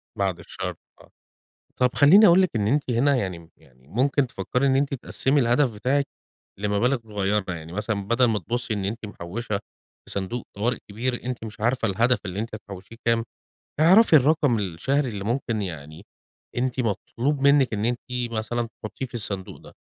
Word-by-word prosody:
بعد 95 Hz, -3 st, -1 dB
الشر، -, -, -6 dB, 0.3 s
آه، -, -, -19 dB, 0.7 s
طب 125 Hz, -, +3 dB
خلّيني 175 Hz, +10 st, +7 dB
أقول 175 Hz, +1 st, +6 dB
لِك 185 Hz, -, +2 dB
إن 105 Hz, -2 st, +1 dB
أنتِ 140 Hz, +2 st, +1 dB
هنا 135 Hz, +4 st, +3 dB
يعني 90 Hz, -8 st, -4 dB
يعني 65 Hz, +1 st, -24 dB
ممكن 135 Hz, -, +1 dB
تفكَّري 125 Hz, +6 st, -1 dB
إن 135 Hz, -, +3 dB
أنتِ 140 Hz, +1 st, +1 dB
تقسِّمي 135 Hz, +2 st, 0 dB
الهدف 120 Hz, +2 st, +3 dB
بتاعِك 135 Hz, +7 st, 0 dB, 0.5 s
لمبالغ 105 Hz, +6 st, +1 dB
صغيّرة، 105 Hz, -2 st, -1 dB
يعني 80 Hz, 0 st, -8 dB
مثلًا 105 Hz, 0 st, -2 dB
بدل 120 Hz, +3 st, +3 dB
ما 110 Hz, -3 st, +1 dB
تبصّي 120 Hz, +5 st, -2 dB
إن 100 Hz, -2 st, -2 dB
أنتِ 110 Hz, +3 st, -4 dB
محوِّشة 105 Hz, +2 st, -4 dB, 0.5 s
في -, -, -16 dB
صندوق 100 Hz, +5 st, -4 dB
طوارئ 115 Hz, +4 st, 0 dB
كبير، 120 Hz, +4 st, -3 dB
أنتِ 125 Hz, -1 st, -4 dB
مش 110 Hz, -1 st, -9 dB
عارفة 120 Hz, +1 st, +1 dB
الهدف 115 Hz, +5 st, +2 dB
اللي 95 Hz, +1 st, -4 dB
أنتِ 110 Hz, 0 st, -4 dB
هتحوشيه 100 Hz, 0 st, -10 dB
كام، 115 Hz, 0 st, +3 dB, 0.6 s
اعرفي 180 Hz, +4 st, +7 dB
الرقم 145 Hz, -4 st, +4 dB
الشهري 125 Hz, -, -1 dB
اللي 100 Hz, -3 st, -5 dB
ممكن 115 Hz, 0 st, -1 dB
يعني، 80 Hz, -4 st, -7 dB, 0.5 s
أنتِ 130 Hz, +1 st, -1 dB
مطلوب 125 Hz, +5 st, -1 dB
منِّك 140 Hz, -4 st, +4 dB
إن 105 Hz, +1 st, -1 dB
أنتِ 120 Hz, 0 st, 0 dB, 0.3 s
مثلًا 115 Hz, +1 st, -2 dB, 0.2 s
تحطيه 110 Hz, +5 st, -5 dB
في 125 Hz, -, -16 dB
الصندوق 100 Hz, -5 st, -1 dB
ده، -, -, -15 dB
115 Hz, 170 wpm, -24 LUFS, 100-130 Hz, 0.7 s, خلّيني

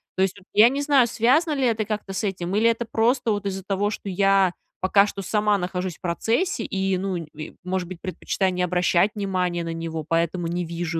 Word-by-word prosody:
То 190 Hz, -, 0 dB
есть, 190 Hz, +1 st, -1 dB
вот 190 Hz, -, -22 dB
я 220 Hz, +3 st, +7 dB
не 280 Hz, +2 st, -2 dB
знаю, 280 Hz, -4 st, +4 dB
связано 275 Hz, +9 st, +2 dB
ли 270 Hz, -2 st, +1 dB
это 220 Hz, -2 st, +1 dB
как-то 210 Hz, -2 st, -4 dB
с 190 Hz, -, -3 dB
этим 190 Hz, -1 st, -2 dB
или 230 Hz, +2 st, +4 dB
это 230 Hz, +1 st, -1 dB
просто 235 Hz, +1 st, +1 dB
вот 205 Hz, -1 st, -2 dB
из-за 190 Hz, -1 st, -4 dB
того, 200 Hz, +1 st, 0 dB
что 210 Hz, -, -6 dB
я 195 Hz, -1 st, +3 dB, 0.3 s
пока 200 Hz, +2 st, +4 dB
что 200 Hz, -, -5 dB
сама 210 Hz, +1 st, +2 dB
нахожусь 180 Hz, -1 st, -3 dB
в -, -, -48 dB
процессе 225 Hz, -, 0 dB
и, 190 Hz, -1 st, -1 dB
ну, 190 Hz, 0 st, -2 dB
нь 165 Hz, -2 st, -6 dB
и, 155 Hz, -, -8 dB
может 180 Hz, -1 st, -2 dB
быть, 180 Hz, -2 st, -9 dB
предпочитаю 185 Hz, +1 st, -1 dB
не 180 Hz, -, -2 dB
обращать 180 Hz, +2 st, +2 dB
внимания 180 Hz, -4 st, -1 dB
на 165 Hz, 0 st, -4 dB
него, 165 Hz, -2 st, -5 dB
поэтому 170 Hz, +1 st, 0 dB
не 175 Hz, +1 st, -2 dB
вижу 165 Hz, 0 st, -3 dB
195 Hz, 225 wpm, -24 LUFS, 180-215 Hz, 0.3 s, я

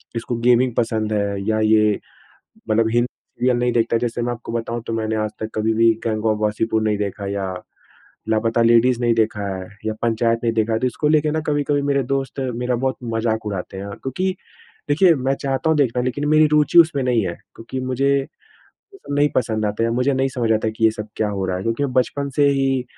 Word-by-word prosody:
इसको 115 Hz, +1 st, -3 dB
गेमिंग 125 Hz, 0 st, +4 dB
पसंद 110 Hz, -2 st, 0 dB
है, 100 Hz, -1 st, -1 dB
या 110 Hz, 0 st, +1 dB
ये 110 Hz, -1 st, +3 dB, 0.7 s
मतलब 110 Hz, +1 st, +2 dB
हिंदी 120 Hz, +1 st, +2 dB, 0.3 s
सीरियल 125 Hz, 0 st, +2 dB
नहीं 120 Hz, 0 st, +1 dB
देखता 115 Hz, 0 st, +1 dB
है। -, -, +2 dB
जैसे 120 Hz, 0 st, -2 dB
मैं 120 Hz, +1 st, -1 dB
आपको 120 Hz, -1 st, -8 dB
बताऊँ 115 Hz, 0 st, -3 dB
तो 115 Hz, -, -2 dB
मैंने 110 Hz, 0 st, -1 dB
आज 110 Hz, 0 st, -1 dB
तक 110 Hz, -, -4 dB
कभी 110 Hz, +1 st, +1 dB
भी 115 Hz, +1 st, +4 dB
गैंग 110 Hz, -1 st, -1 dB
ऑफ़ 110 Hz, -1 st, +1 dB
वासेपुर 110 Hz, +1 st, 0 dB
नहीं 105 Hz, -1 st, +1 dB
देखा 100 Hz, 0 st, -4 dB
या 100 Hz, -2 st, -3 dB, 0.8 s
लापता 115 Hz, +1 st, +1 dB
लेडीज़ 120 Hz, +1 st, +4 dB
नहीं 120 Hz, -1 st, +3 dB
देखा 110 Hz, -2 st, 0 dB
है 95 Hz, -1 st, -7 dB, 0.2 s
या 110 Hz, -, -1 dB
पंचायत 115 Hz, 0 st, +1 dB
नहीं 115 Hz, -1 st, +1 dB
देखा 110 Hz, 0 st, 0 dB
है। 110 Hz, -, +1 dB
तो 130 Hz, -, +1 dB
इसको 150 Hz, +4 st, -1 dB
लेके 155 Hz, -1 st, +3 dB
ना 155 Hz, -, 0 dB
कभी-कभी 145 Hz, -1 st, +1 dB
मेरे 140 Hz, -1 st, +1 dB
दोस्त 135 Hz, +1 st, -3 dB, 0.2 s
मेरा 125 Hz, +1 st, -1 dB
बहुत 130 Hz, +2 st, -1 dB, 0.2 s
मज़ाक 110 Hz, -1 st, -1 dB
उड़ाते 95 Hz, -2 st, -5 dB
हैं। 100 Hz, +1 st, -6 dB
क्योंकि 185 Hz, +8 st, -2 dB, 0.5 s
देखिए 170 Hz, +4 st, +5 dB
मैं 130 Hz, 0 st, 0 dB
चाहता 135 Hz, +3 st, -1 dB
हूँ 160 Hz, -, +3 dB
देखना, 125 Hz, -4 st, +1 dB
लेकिन 130 Hz, +3 st, -2 dB
मेरी 155 Hz, 0 st, +5 dB
रूचि 150 Hz, +3 st, +5 dB
उसमें 155 Hz, -5 st, +4 dB
नहीं 120 Hz, -5 st, +1 dB
है। 85 Hz, -, -3 dB, 0.2 s
क्योंकि 125 Hz, +3 st, -6 dB
मुझे 130 Hz, +1 st, 0 dB
ये 135 Hz, -, -4 dB, 0.8 s
सब -, -, -3 dB
नहीं 145 Hz, +1 st, +3 dB
पसंद 110 Hz, -3 st, 0 dB
आता 105 Hz, +2 st, -1 dB
है। 115 Hz, -, +1 dB
मुझे 125 Hz, +4 st, +1 dB
नहीं 135 Hz, +1 st, +1 dB
समझ 120 Hz, -3 st, -1 dB
आता 110 Hz, 0 st, 0 dB
है -, -, -4 dB
कि 110 Hz, +1 st, -2 dB
ये 110 Hz, -, +6 dB
सब 105 Hz, -1 st, -7 dB
क्या 110 Hz, -, 0 dB
हो 100 Hz, -2 st, -3 dB
रहा 90 Hz, -1 st, -1 dB
है 95 Hz, -, -5 dB
क्योंकि 115 Hz, +6 st, -1 dB
मैं 130 Hz, -, -2 dB
बचपन 140 Hz, +2 st, 0 dB
से 145 Hz, -1 st, +4 dB
ही 135 Hz, -2 st, +1 dB
115 Hz, 225 wpm, -21 LUFS, 110-130 Hz, 0.8 s, ये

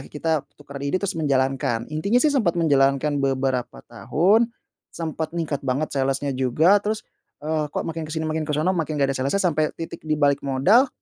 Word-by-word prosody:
kita 160 Hz, +1 st, 0 dB, 0.2 s
tukeran 140 Hz, -1 st, -10 dB
ide 165 Hz, -, +1 dB
terus 200 Hz, -, -1 dB
menjalankan. 130 Hz, -5 st, 0 dB
Intinya, 180 Hz, +10 st, +1 dB
sih, 300 Hz, -, +4 dB
sempat 210 Hz, -12 st, +1 dB
menjalankan 140 Hz, -2 st, +2 dB
beberapa 130 Hz, -, -1 dB
tahun, 210 Hz, +9 st, +2 dB, 0.4 s
sempat 160 Hz, 0 st, -5 dB
ningkat 155 Hz, -4 st, -2 dB
banget 140 Hz, +5 st, -1 dB
sales-nya 135 Hz, +1 st, 0 dB
juga, 145 Hz, +10 st, +3 dB
terus, 210 Hz, +1 st, -3 dB, 0.4 s
eee, 155 Hz, -1 st, -1 dB
kok, -, -, -3 dB
makin 165 Hz, 0 st, -4 dB
ke -, -, -9 dB
sini 160 Hz, 0 st, -2 dB
makin 155 Hz, 0 st, -1 dB
ke -, -, 0 dB
sono, 160 Hz, +5 st, +1 dB
makin 160 Hz, -4 st, -2 dB
nggak 140 Hz, -1 st, +1 dB
ada -, -, -4 dB
sales-nya, 140 Hz, +10 st, 0 dB
sampai 155 Hz, 0 st, +1 dB
titik 165 Hz, -, -7 dB
di 155 Hz, -, +2 dB
balik 145 Hz, -1 st, +2 dB
modal, 140 Hz, -, +3 dB
155 Hz, 185 wpm, -23 LUFS, 135-165 Hz, 0.4 s, sih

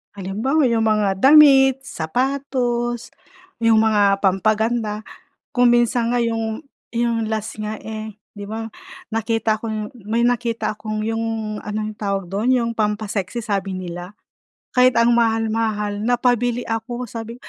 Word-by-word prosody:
Halimbawa 215 Hz, +11 st, 0 dB
yung 225 Hz, -1 st, +1 dB
mga 205 Hz, -3 st, +1 dB
damit, 270 Hz, -1 st, +6 dB
sapatos, 245 Hz, -, -2 dB, 0.5 s
yung 225 Hz, -1 st, +4 dB
mga 205 Hz, -3 st, +3 dB
pampaganda. 215 Hz, +2 st, +1 dB, 0.5 s
Kung 245 Hz, -1 st, +5 dB
minsan 240 Hz, 0 st, +2 dB
nga 245 Hz, -, +1 dB
yung 225 Hz, -1 st, -1 dB, 0.3 s
yung 230 Hz, -2 st, 0 dB
last 220 Hz, 0 st, -4 dB
nga, 215 Hz, 0 st, -3 dB
eh, 220 Hz, -1 st, -7 dB, 0.2 s
'di 205 Hz, -1 st, -8 dB
ba, 225 Hz, +1 st, -4 dB, 0.5 s
nakita 225 Hz, -1 st, 0 dB
ko 225 Hz, -, -5 dB
yung, 215 Hz, -1 st, -3 dB, 0.2 s
may 235 Hz, +2 st, +1 dB
nakita 235 Hz, -2 st, 0 dB
akong 215 Hz, 0 st, -4 dB
yung 225 Hz, -1 st, -2 dB
ano, 210 Hz, +1 st, -4 dB
yung 215 Hz, -1 st, -7 dB
tawag 195 Hz, -2 st, -2 dB
dun, 205 Hz, +7 st, -2 dB
yung 235 Hz, -2 st, +2 dB
pampa-sexy 210 Hz, 0 st, -2 dB
sabi 195 Hz, -3 st, -2 dB
nila, 180 Hz, +2 st, -7 dB, 0.6 s
kahit 250 Hz, 0 st, +4 dB
ang 230 Hz, +1 st, +4 dB
mahal-mahal 225 Hz, -3 st, 0 dB
napabili 245 Hz, +1 st, +1 dB
ako 240 Hz, +2 st, -4 dB
sabi 230 Hz, 0 st, -7 dB
225 Hz, 135 wpm, -21 LUFS, 210-240 Hz, 0.6 s, damit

